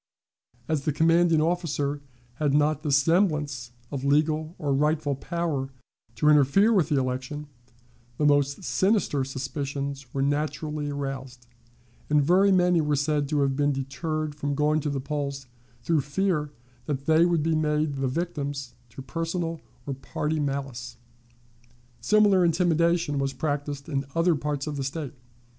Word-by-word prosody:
As 155 -3 -1
the 150 - +2
commanding 165 +1 +3
officer 155 -4 -1 0.4
had 145 -2 +1
not 150 0 +2
the 150 -2 -2
semblance 150 -4 +2 0.2
of 135 -2 -4
legal 155 +3 +1
or 145 -2 -1
rightful 150 +1 +1
power 145 -1 -2 0.5
to 150 - +1
interfere 150 - +5
with 175 -7 +2
the 145 - +2
election, 130 +3 -3 0.7
the 150 - +1
most 145 +3 +2
sinister 190 -8 +1
suspicions 140 0 -4
were 135 - -1
naturally 150 +1 -1
aroused, 135 -3 -5 0.6
and 150 0 +4
very 190 +6 +4
many 180 -2 +4
were 150 -1 +1
said 145 0 0
to 150 -2 +1
have 135 -1 +1
been 145 +1 +2
deterred 145 +3 -3
from 145 -1 -3
going 150 +1 +2
to 150 - -2
the 140 -1 -2
polls 140 0 -4 0.4
through 165 -3 +2
fear 150 +1 -1 0.4
that 140 -2 -3
they 160 +1 +5
would 170 -3 +2
be 165 +1 +1
made 150 -2 0
the 135 0 0
victims 140 -3 -3 0.2
to 130 +3 -10
personal 165 +1 -3 0.2
or 140 - -3
party 150 +3 -3
malice. 135 -4 -4 1.0
Similar 205 -3 +4
intimidation 170 -3 +2
was 135 0 -1
practiced 145 0 -3
in 140 -2 -2
other 165 +1 +3
parts 145 -1 -2
of 150 -2 -4
the 135 - -2
State. 140 +1 -4
150 Hz, 150 wpm, -26 LUFS, 140-160 Hz, 1.0 s, interfere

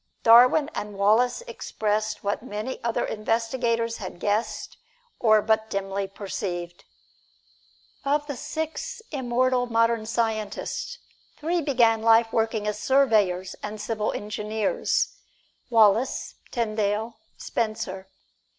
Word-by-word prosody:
Darwin 250 +6 +7
and 210 -1 -5
Wallace 220 - +3
expressed 215 - -2
what 200 0 -1
many 225 +1 -5
other 235 -1 0
investigators 230 +1 -1
had 185 -4 -7
guessed 210 +4 -2 0.4
or 215 -3 +4
but 220 0 +1
dimly 195 0 -2
perceived. 185 -2 -5 1.2
Of 290 +1 +1
the 285 -2 -5
six 320 - -5
immortal 255 -2 +1
modern 230 -1 +1
scientists, 225 - -2 0.4
three 335 +3 0
began 235 -6 +3
life 225 0 +4
working 225 -2 0
as 210 0 -2
surveyors 210 -9 +2
and 210 +1 -6
civil 215 0 -1
engineers 210 0 -1 0.5
Wallace, 225 +2 +3 0.2
Tyndall, 220 -1 -1 0.2
Spencer. 215 -4 -3
225 Hz, 105 wpm, -25 LUFS, 210-245 Hz, 1.2 s, Darwin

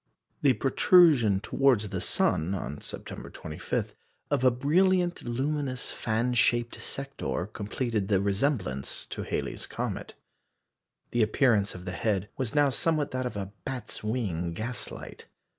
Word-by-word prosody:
The 140 -3 +5
protrusion 135 - +5
towards 120 -5 +2
the 95 -3 -3
sun, 85 +5 +1
on 75 -5 -5
September - - -7
25, 75 -1 -4 0.4
of - - +2
a 130 - +7
brilliant 175 +8 +2
luminous 130 +1 -1
fan 115 +2 0
shaped 120 -2 +2
sector 135 -9 -3
completed 105 +1 -2
the 100 -2 +3
resemblance 100 - -1
to - - -5
Halley's - - -3
comet. - - -4 1.0
The 120 - +1
appearance 110 -2 +3
of 90 0 -9
the 90 - -3
head 100 +1 -1
was 130 -1 -3
now 145 -1 +5
somewhat 155 +2 +1
that 130 0 -1
of 110 - -6
a 100 0 -5
"bat's 125 -6 -4
wing" 95 -7 -1
gaslight. 120 +8 -5
120 Hz, 135 wpm, -28 LUFS, 100-135 Hz, 1.0 s, a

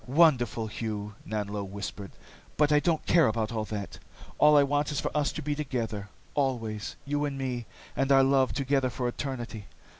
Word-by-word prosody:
"Wonderful, 130 -6 +4
Hugh," 105 -1 -4
Nanlo 105 -1 -2
whispered. 100 0 -6 0.5
"But 150 0 +4
I 150 - +6
don't 160 0 0
care 165 -5 +5
about 110 -1 0 0.2
that. 105 -2 -5 0.4
All 150 0 +7
I 145 - +7
want 145 +2 0
is 145 - -1
for - - -3
us 150 -1 +2
to 155 - -5
be 150 +1 0
together. 120 -8 -3 0.2
Always. 115 -7 -1
You 145 +1 -1
and 140 -1 -3
me, 125 -3 -3 0.3
and 135 0 +1
our 135 0 +7
love, 135 -1 +3
together 135 -1 +1
for 125 +1 -2
eternity. 120 -5 -5
130 Hz, 175 wpm, -28 LUFS, 110-145 Hz, 0.5 s, All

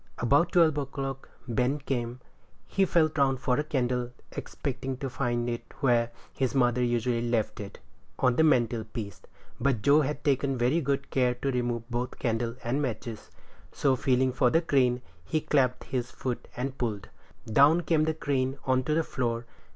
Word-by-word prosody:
About 140 +8 +3
twelve 160 -4 +4
o'clock 135 -1 -5 0.2
Ben 125 +4 +1
came. 125 -3 -3 0.4
He 195 - +1
felt 160 -3 +2
round 135 -2 +3
for 125 0 +1
a - - +1
candle, 125 -5 -1 0.2
expecting 130 -1 -4
to 135 0 -4
find 120 -2 -1
it 120 -1 -3 0.2
where 120 -3 +3 0.2
his 130 0 -1
mother 125 -1 +3
usually 120 0 +1
left 115 -3 0
it 100 -1 -7 0.4
on 125 -1 +3
the 160 - +4
mantel 120 -6 +3
piece; 105 -2 -7 0.4
but 130 -6 +1
Joe 145 +2 +6
had 150 0 -3
taken 140 -1 +1
very 125 +8 +2
good 140 -1 -2
care 125 -2 +2
to 135 +2 -2
remove 120 -2 -2
both 125 +1 -3
candle 115 0 -1
and 125 +5 0
matches; 115 -5 -4 0.4
so, 135 -2 +2
feeling 130 0 +2
for 125 0 +3
the 165 +6 +2
crane, 125 -5 +2 0.2
he 155 - 0
clapped 130 -4 +1
in - - -18
his 125 -2 -1
foot 125 -1 -4
and 130 +2 -3
pulled; 110 -5 -3 0.4
down 140 +9 +5
came 160 -2 +2
the 160 0 0
crane 135 -3 -1
on 130 -1 +3
to 150 - +1
the 165 - +2
floor. 120 -4 -2
130 Hz, 175 wpm, -28 LUFS, 120-140 Hz, 0.4 s, Joe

